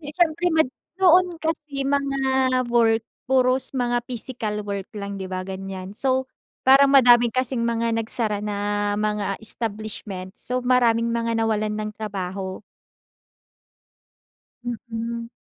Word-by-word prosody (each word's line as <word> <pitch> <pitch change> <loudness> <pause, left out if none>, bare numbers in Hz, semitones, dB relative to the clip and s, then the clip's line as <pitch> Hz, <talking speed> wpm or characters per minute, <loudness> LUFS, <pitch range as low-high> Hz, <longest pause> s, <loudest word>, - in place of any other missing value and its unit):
Eh, 295 -1 -8
siyempre 345 0 +2
mad 315 -5 +3 0.3
noon 360 -1 +4
kasi 300 -4 -2
mga 275 -1 0 0.5
work 225 -2 +3 0.2
puros 255 0 +2
mga 245 -1 +1
physical 225 -3 -3
work 200 -1 -4
lang 200 0 -5
'di 190 - -5
ba 185 0 -4
ganiyan 190 0 -6
so, 260 -1 0 0.4
parang 275 +1 +6
madami 240 -2 +7
kasing 250 0 -1
mga 230 0 0
nagsara 220 -2 0
na 205 0 -1
mga 210 -1 -1
establishments, 215 -4 -2
so 250 0 -1
maraming 235 -2 +3
mga 230 0 -1
nawalan 215 -1 0
ng 215 0 -3
trabaho. 195 -3 -5 2.0
Mm. 235 -1 -5
230 Hz, 120 wpm, -23 LUFS, 205-260 Hz, 2.0 s, madami